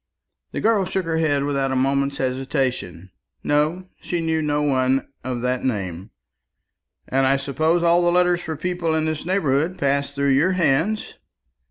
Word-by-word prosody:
The - - -4
girl 215 -3 +3
shook 185 0 -2
her 165 -1 -1
head 145 -3 +1
without 140 -2 0
a - - 0
moment's 140 +1 +1
hesitation. 130 - -2 0.3
No, 155 +5 0
she 175 - -2
knew 160 -1 0
no 150 -1 0
one 130 -1 +1 0.2
of 125 -1 -3
that 125 0 -1
name. 95 -6 -3 1.0
"And 135 0 +2
I 135 +1 +3
suppose 155 +5 0
all 170 +1 +4
the 175 0 +3
letters 180 0 +3
for 160 -2 -4
people 170 0 -1
in 155 0 0
this 155 +1 -3
neighbourhood 165 -2 +1
pass 140 0 0
through 140 0 0
your 155 +8 +3
hands?" 180 +5 +1
145 Hz, 165 wpm, -22 LUFS, 135-170 Hz, 1.0 s, all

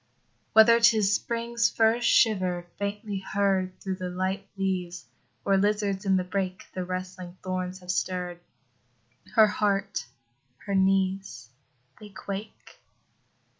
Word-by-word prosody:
Whether 230 +1 +7
'tis 220 -4 +4
Spring's 235 +1 0
first 230 +1 +2
shiver, 185 -5 +3
faintly 205 0 -3
heard 190 -2 0
Through 190 -1 -4
the 185 -1 -4
light 190 +2 -3
leaves, 180 -3 -2 0.4
or 195 -1 +3
lizards 205 0 0
in 190 - +4
the 185 - 0
brake 185 0 -3
The 185 - -3
rustling 185 0 -6
thorns 185 0 -3
have 180 0 -3
stirr'd, 180 -1 -2 1.0
Her 220 -2 +8
heart, 200 - -1 0.6
her 200 - -3
knees, 190 -6 +1 0.5
they 210 - -11
quake. 200 +2 -8
195 Hz, 120 wpm, -27 LUFS, 185-210 Hz, 1.0 s, Her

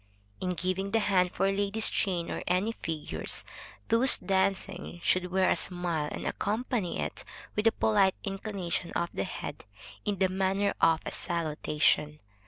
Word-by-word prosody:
In 180 -1 -2
giving 185 +3 -2
the 225 - +2
hand 185 -4 +2
for 195 +1 +1
ladies' 205 +2 +2
chain 180 -4 -1
or - - -3
any 185 +5 +1
figures, 160 -8 -3 0.4
those 240 +4 +8
dancing 190 -1 -1
should 180 0 +1
wear 190 +1 +2
a - - +3
smile, 175 -4 -1
and - - -5
accompany 215 -2 -2
it - - -4 0.3
with 210 +2 +2
a - - +6
polite 200 -4 +3
inclination 195 -3 -3
of 170 - -1
the 95 - -2
head, - - -6 0.4
in 205 -1 -1
the 190 - +3
manner 190 +2 0
of 165 -1 +4
a - - -3
salutation. 150 -2 0
190 Hz, 155 wpm, -29 LUFS, 175-200 Hz, 0.4 s, those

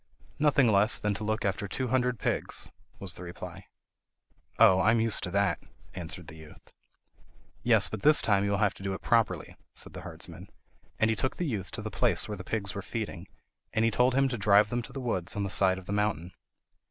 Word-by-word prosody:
"Nothing 145 -4 +4
less 105 +2 +4
than 105 0 -1
to 105 - -5
look 110 0 -1
after 100 +1 -1
two 130 +5 -2
hundred 125 -1 +1
pigs," - - -1 0.3
was 95 -2 -4
the - - -10
reply. 85 -1 -9 0.9
"Oh, 95 0 +6
I 100 - +3
am 115 0 +4
used 115 -2 +1
to - - -4
that," 100 +2 +1 0.3
answered 90 0 -6
the 80 - -11
youth. 80 -1 -15 0.9
"Yes; 115 -4 +4
but 110 - -6
this 150 0 +6
time 100 -2 +3
you 100 - 0
will 100 - +1
have 100 0 +2
to - - -13
do 95 0 -2
it 95 - -7
properly," 110 -8 +1 0.2
said - - -7
the - - -8
herdsman; - - -7 0.5
and 110 0 +3
he - - 0
took 130 +5 -2
the 175 - -1
youth 105 - -3
to 110 -2 -5
the 110 - -5
place - - +1
where 105 - -4
the 90 - -8
pigs 100 -1 -3
were 100 - -4
feeding, 100 -3 -5 0.5
and 115 0 +2
told 125 +2 +3
him 135 0 +4
to 120 -3 -4
drive 105 +1 +4
them 120 0 0
to - - -10
the 135 - -6
woods 105 -9 -2
on 100 - -1
the 100 - -2
side 95 -2 +4
of 95 - -10
the 100 - -4
mountain. 100 -4 -1
105 Hz, 225 wpm, -29 LUFS, 95-115 Hz, 0.9 s, Oh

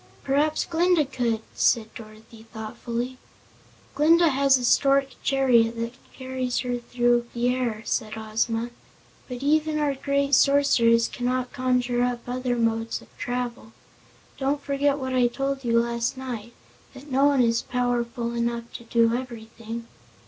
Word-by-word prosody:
"Perhaps 295 +3 +1
Glinda 340 -1 +2
could," 240 -4 -1
said 225 -2 +1
Dorothy 220 +1 -13
thoughtfully. 235 +3 -5 0.7
"Glinda 330 +3 +5
has 275 -1 +4
a 250 - -3
stork 275 +2 +3
chariot 245 -4 +3
that 230 +1 -3 0.2
carries 260 -1 -3
her 245 -1 -2
through 240 0 +1
the 240 +1 +1
air," 240 -4 -1
said 215 -3 -2
Ozma, 225 +2 -2 0.6
"but 250 +1 -6
even 305 +1 +2
our 295 -2 +1
great 280 +1 -1
Sorceress 255 -4 +4
cannot 250 0 -2
conjure 250 -1 0
up 245 -1 0
other 250 0 -2
modes 225 -1 -1
of - - -23
travel. 245 -2 -4 0.7
Don't 280 +1 -1
forget 280 0 +1
what 260 -2 -4
I 250 -1 +4
told 275 +2 -3
you 230 -1 +3
last 235 +2 -1
night, 240 -3 -6 0.4
that 270 +2 -12
no 270 +2 +3
one 280 -3 +4
is 230 0 +2
powerful 240 -1 -2
enough 235 0 -3
to 235 - -14
do 230 0 +2
everything." 230 -2 -7
245 Hz, 140 wpm, -25 LUFS, 235-270 Hz, 0.7 s, Glinda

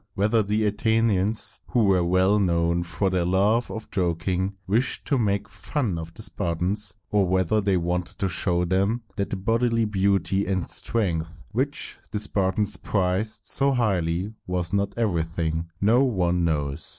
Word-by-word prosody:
Whether 105 +3 +2
the 105 +1 0
Athenians, 105 -1 +1
who 120 -3 +2
were 95 -3 +3
well 95 +4 +3
known 85 -2 +1
for 85 +3 -1
their 90 -2 +1
love 100 +7 +2
of 110 - -7
joking, 90 +2 -1
wished 110 +7 +1
to 140 - +1
make 100 -3 0
fun 100 - -2
of 80 0 -7
the 110 - -4
Spartans, 90 +1 -1 0.2
or 100 -3 +3
whether 95 +3 +2
they 100 -2 +2
wanted 90 0 -2
to 100 - 0
show 90 0 +1
them 100 +6 0
that 100 0 -2
the - - -2
bodily 115 +3 +1
beauty 100 -2 +1
and 95 -3 0
strength 85 -6 -2
which 135 +6 -1
the 105 - -3
Spartans 105 0 +1
prized 100 +3 -1
so 140 0 +1
highly 95 -4 0
was 90 -1 -2
not 100 +1 0
everything, 85 -5 -1
no 115 +7 +4
one 90 -8 +1
now 85 - +2
knows. 70 -2 -2
95 Hz, 160 wpm, -25 LUFS, 90-110 Hz, 0.2 s, no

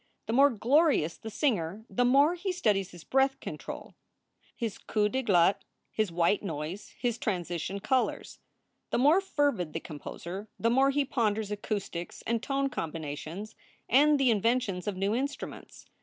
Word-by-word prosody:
The 225 - -2
more 275 +3 +6
glorious 255 - +2
the 220 - -8
singer 210 - -1
the 245 - 0
more 280 +6 +5
he 365 +2 -2
studies 210 - +1
his 175 -2 -12
breath 270 0 +2
control, - - -7 0.6
his 225 -4 -4
coups 210 -1 0
de 265 - +1
glotte, 190 -5 +3 0.3
his 215 -5 0
white 170 +4 +2
notes, 165 +1 -5
his 240 -2 -1
transition 180 -1 -2
colors. 250 +5 -1 0.5
The - - 0
more 295 +9 +5
fervid 285 - 0
the 165 - -2
composer 170 +6 -7
the 230 - +2
more 265 +3 +4
he 280 0 +1
ponders 220 -5 0
acoustics 200 -4 -4
and 230 -1 0
tone 275 +1 0
combina 160 - -4
tions 190 +9 -7 0.3
and 290 +3 +5
the 260 -3 +4
inventions 220 -4 0
of 200 -3 -2
new 195 +2 0
instruments. 280 +4 -5
220 Hz, 155 wpm, -29 LUFS, 185-270 Hz, 0.6 s, more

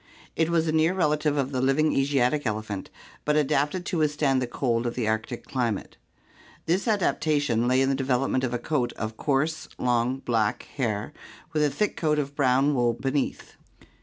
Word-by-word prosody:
It 160 0 +1
was 165 -1 +2
a - - +2
near 160 +3 +2
relative 150 -3 +1
of 135 -1 0
the 130 -2 -1
living 135 +4 +2
Asiatic 135 0 +1
elephant, 110 -2 -4 0.3
but 150 - +1
adapted 150 +4 +1
to 170 - -1
withstand 145 -3 +2
the 125 - -1
cold 120 -1 -1
of 120 - -3
the 120 -3 -1
Arctic 110 +2 -2
climate. 120 -6 -2 0.7
This 180 +7 0
adaptation 145 - +1
lay 130 +1 +3
in 135 - +2
the - - +2
development 130 -1 0
of 130 - 0
a 120 - 0
coat 125 -1 -1
of 110 0 -5
coarse, 155 +5 -1
long, 125 +1 +1
black 115 -5 0
hair 115 -1 -2 0.4
with 155 - +1
a 150 - +3
thick 205 +10 -1
coat 155 -2 +1
of 140 -1 -2
brown 135 +1 +3
wool 120 -3 +2
beneath. 135 +3 -2
135 Hz, 180 wpm, -26 LUFS, 120-150 Hz, 0.7 s, lay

